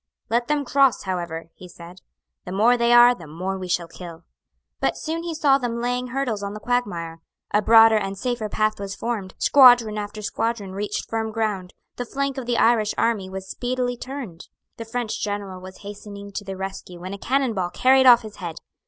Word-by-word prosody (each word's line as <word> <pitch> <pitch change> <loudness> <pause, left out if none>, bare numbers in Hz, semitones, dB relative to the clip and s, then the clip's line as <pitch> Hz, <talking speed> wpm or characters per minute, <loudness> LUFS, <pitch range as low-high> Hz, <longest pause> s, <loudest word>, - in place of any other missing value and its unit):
"Let 235 +1 +1
them 295 0 0
cross, 275 0 +3
however;" 170 -3 -4
he 180 - -12
said. 175 +1 -13 0.4
"The 180 - -6
more 220 +6 +4
they 235 0 +2
are, 240 0 +8
the 175 -9 -12
more 185 +5 -4
we 185 - -5
shall 175 -1 -1
kill." 170 -1 -10 0.6
But - - 0
soon 325 +1 -3
he 335 -1 -4
saw 280 -3 +3
them 235 -2 -3
laying 245 +1 -1
hurdles 245 -4 -2
on 200 0 -5
the - - -6
quagmire. 175 -9 -2 0.3
A 210 - +3
broader 225 0 +7
and 195 -1 -4
safer 235 0 -2
path 215 0 0
was 200 0 -5
formed; 220 -5 -4
squadron 245 -6 +6
after 210 +1 -6
squadron 215 -2 -2
reached 205 +2 -4
firm 225 -1 -2
ground: 210 -5 -3 0.2
the 245 - -3
flank 275 +2 -2
of 245 - -7
the 240 -1 +1
Irish 225 -2 +3
army 215 -5 0
was 190 0 -7
speedily 245 +1 -2
turned. 245 -9 -8 0.3
The 230 - -6
French 235 -1 -3
general 200 -3 -4
was 185 0 -11
hastening 200 0 -9
to 200 - -5
the 195 -1 -6
rescue 190 -2 -7
when 185 +2 -6
a 200 - -7
cannon 265 0 0
ball 185 -3 -2
carried 260 +5 +4
off 240 -2 +8
his 215 -1 -10
head. 170 -4 -6
215 Hz, 200 wpm, -23 LUFS, 190-245 Hz, 0.6 s, are